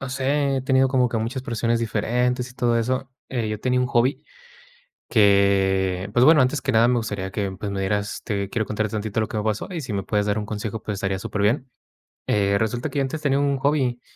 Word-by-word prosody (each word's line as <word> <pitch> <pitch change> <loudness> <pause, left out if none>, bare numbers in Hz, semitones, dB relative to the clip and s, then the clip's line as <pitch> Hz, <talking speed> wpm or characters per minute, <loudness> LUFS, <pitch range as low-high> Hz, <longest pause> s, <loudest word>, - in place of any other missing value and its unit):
no 135 - -5
sé, 135 +2 0
he 130 - -2
tenido 130 0 +3
como 125 -2 +2
que 115 - -3
muchas 115 +4 -3
presiones 115 -1 0
diferentes 125 +3 -1
y 125 - -16
todo 120 -2 +1
eso, 130 +3 -1 0.2
eh, 120 -4 -2
yo 105 -1 -4
tenía 125 0 +1
un 125 - +1
hobby. 120 +4 +1 0.9
Que 100 -2 +3
pues 120 +1 +4
bueno, 155 -1 +7
antes 130 +3 0
que 140 - -1
nada 115 0 +4
me 125 0 +2
gustaría 100 -4 -4
que 100 -1 -2
pues 100 +2 -5
me 95 - -3
dieras. 100 +1 -2
Te 100 -3 -2
quiero 110 -2 -1
contar 110 0 -1
tantito 110 0 -2
lo 110 - 0
que 110 - -4
me 105 - -1
pasó 110 -1 -1
y 175 -3 -4
si 125 -7 -5
me 100 - -1
puedes 105 +1 0
dar 105 +1 0
un 105 - -3
consejo, 105 +1 -5
pues 105 - -4
estaría 95 -1 -2
superbien, 105 +7 -1 0.6
eh, 100 -1 +2
resulta 110 +3 -1
que 145 - -3
yo - - +3
antes 135 +4 -3
tenía 140 -2 +1
un 140 -1 +1
hobby 135 -4 0
115 Hz, 235 wpm, -23 LUFS, 105-130 Hz, 0.9 s, bueno